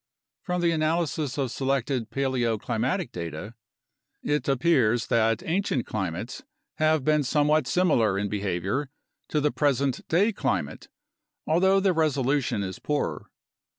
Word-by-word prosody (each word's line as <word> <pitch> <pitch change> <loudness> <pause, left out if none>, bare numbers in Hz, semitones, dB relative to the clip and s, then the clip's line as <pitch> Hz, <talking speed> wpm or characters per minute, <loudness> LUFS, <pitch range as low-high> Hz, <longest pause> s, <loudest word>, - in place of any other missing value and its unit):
From 180 -2 -2
the 170 -1 +3
analysis 155 -3 0
of 135 -4 -1
selected 135 -3 -1
paleoclimatic 130 - -1
data, 85 +5 -6 0.7
it 150 0 -1
appears 130 -5 +2
that 115 +4 +2
ancient 175 - -1
climates 95 +3 -4 0.4
have 155 -2 +2
been 150 -1 +3
somewhat 150 0 +2
similar 125 - +2
in 100 +1 -1
behavior 100 - -2 0.4
to 155 - +1
the 150 0 +1
present 140 -3 0
day 200 +7 +2
climate, 95 - -2 0.6
although 190 +4 +3
the 190 -1 +2
resolution 140 -8 +1
is 95 -1 -5
poorer. 150 -1 -2
135 Hz, 120 wpm, -26 LUFS, 115-155 Hz, 0.7 s, the